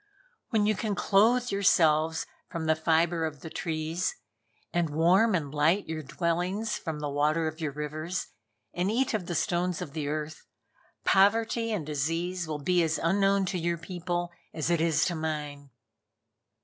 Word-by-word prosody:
When 220 -4 +2
you 215 - +3
can 210 0 -2
clothe 230 +6 +3
yourselves 160 -5 +3 0.2
from 165 -1 -4
the 160 0 +3
fibre 165 +1 +2
of 150 -3 -4
the 160 - -8
trees, 160 +2 -2 0.6
and 170 -2 +1
warm 180 +8 +4
and 145 -5 -2
light 160 +7 +2
your 160 0 -3
dwellings 180 +8 -1
from 160 -4 -5
the 150 - -2
water 155 +3 +1
of 155 +1 -6
your 150 -2 -1
rivers, 155 +5 -4 0.5
and 180 +2 0
eat 250 +4 +1
of 195 -5 -2
the 175 - -3
stones 175 +2 0
of 165 -6 -6
the 150 -2 -3
earth, 155 +1 -4 0.6
Poverty 225 +3 +3
and 195 -8 -2
Disease 165 +4 -2
will 150 -2 -4
be 180 +1 +3
as 160 -1 +1
unknown 195 +3 +2
to 180 0 -2
your 170 0 0
people 175 0 -3 0.2
as 160 +1 -1
it 170 -2 +2
is 160 -1 +2
to 180 - 0
mine." 150 -3 -4
170 Hz, 165 wpm, -28 LUFS, 155-185 Hz, 0.6 s, warm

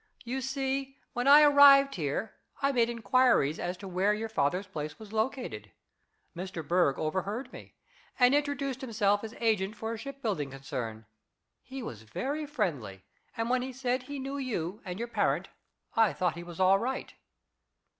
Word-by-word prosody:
You 260 +2 -3
see, 270 +1 -2 0.2
when 245 +2 -1
I 290 +2 +9
arrived 280 -1 +8
here 165 +5 -3 0.3
I 275 0 +2
made 240 -3 +2
inquiries 230 - +2
as 175 +1 -3
to 195 - -9
where 190 +3 +1
your 220 +1 -4
father's 180 0 0
place 155 -5 -6
was 215 -1 -12
located. 220 - -2 0.7
Mr. 175 -3 -6
Berg 175 -5 +3
overheard 195 - -3
me, - - -12 0.4
and 250 +1 +5
introduced 280 -2 -1
himself 205 -5 +1
as 225 +1 -7
agent 215 -3 +1
for 220 +1 -4
a 225 - -6
shipbuilding 225 - -3
concern. 120 -5 -6 0.6
He 265 0 -8
was 110 - -7
very 275 - -4
friendly, 145 - -3 0.3
and 225 0 -1
when 250 +1 +2
he 260 +1 -4
said 255 0 -1
he 285 +3 -7
knew 270 +1 -4
you 210 -7 -3
and 180 -1 -5
your 235 +2 -3
parent, 235 - 0 0.5
I 225 -7 +4
thought 175 +4 0
he 170 - -8
was 175 0 -10
all 190 +1 +5
right." 260 +4 -3
225 Hz, 165 wpm, -30 LUFS, 180-265 Hz, 0.7 s, I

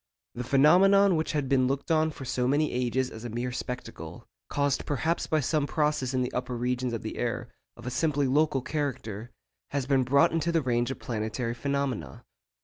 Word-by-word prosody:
The 125 - -4
phenomenon 180 +9 +5
which 160 +1 -1
had 145 -3 0
been 130 -1 +3
looked 140 +5 -2
on 160 0 +3
for 140 -3 -8
so 125 0 0
many 145 +3 +2
ages 125 +1 0
as 110 - -9
a 120 - -4
mere 120 +3 -3
spectacle, 125 0 -6 0.2
caused 140 -1 0
perhaps 155 +4 0
by 155 -1 +1
some 145 +2 0
process 150 -4 0
in 130 -1 +1
the 125 - -4
upper 125 0 -3
regions 125 +1 -1
of 115 - -4
the 110 - -5
air, 120 0 -2 0.3
of 120 - -12
a 125 - -3
simply 145 0 +1
local 140 0 +2
character, 120 -8 -3 0.4
has 140 -2 -2
been 135 -1 +3
brought 140 +6 +4
into 165 +1 0
the 165 -2 +1
range 120 -1 +1
of 135 - -4
planetary 115 +1 -3
phenomena. 130 - -3
130 Hz, 195 wpm, -28 LUFS, 125-150 Hz, 0.4 s, phenomenon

